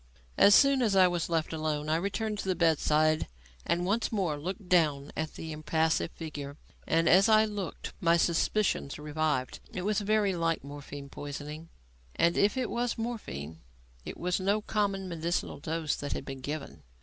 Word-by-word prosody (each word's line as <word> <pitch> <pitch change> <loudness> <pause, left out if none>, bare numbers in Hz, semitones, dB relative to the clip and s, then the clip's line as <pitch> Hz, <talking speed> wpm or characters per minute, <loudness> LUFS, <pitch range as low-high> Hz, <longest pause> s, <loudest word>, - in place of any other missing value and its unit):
As 200 - +7
soon 275 -2 +5
as 215 -5 +2
I 185 -1 +7
was 175 -2 -2
left 165 -1 -1
alone, 155 -1 -2
I 155 - +2
returned 200 +4 -2
to - - -4
the 185 - +2
bedside 155 -2 +2 0.4
and 170 +2 +1
once 210 +5 0
more 190 -8 0
looked 180 +6 -6
down 150 -6 +2
at 155 0 -3
the 160 - -6
impassive 160 +2 0
figure. 145 -3 -7 0.3
And 165 0 +2
as 190 +5 +6
I 215 0 +6
looked, 205 -4 -5
my 170 0 +4
suspicions 170 -2 +1
revived. 150 -3 -2
It 185 - -4
was 210 +1 +1
very 205 -1 +2
like 165 -3 0
morphine 145 0 -8
poisoning; 150 +3 -7 0.5
and, 170 0 +3
if 205 +5 +2
it 255 - -1
was 240 0 -1
morphine, 80 - -5 0.4
it - - -7
was 180 +2 -1
no 200 +3 +1
common, 200 -3 -1
medicinal 170 -3 -2
dose 160 0 -2
that 145 - -4
had - - -5
been 135 -1 -7
given. 145 +2 -6
165 Hz, 175 wpm, -29 LUFS, 150-200 Hz, 0.5 s, As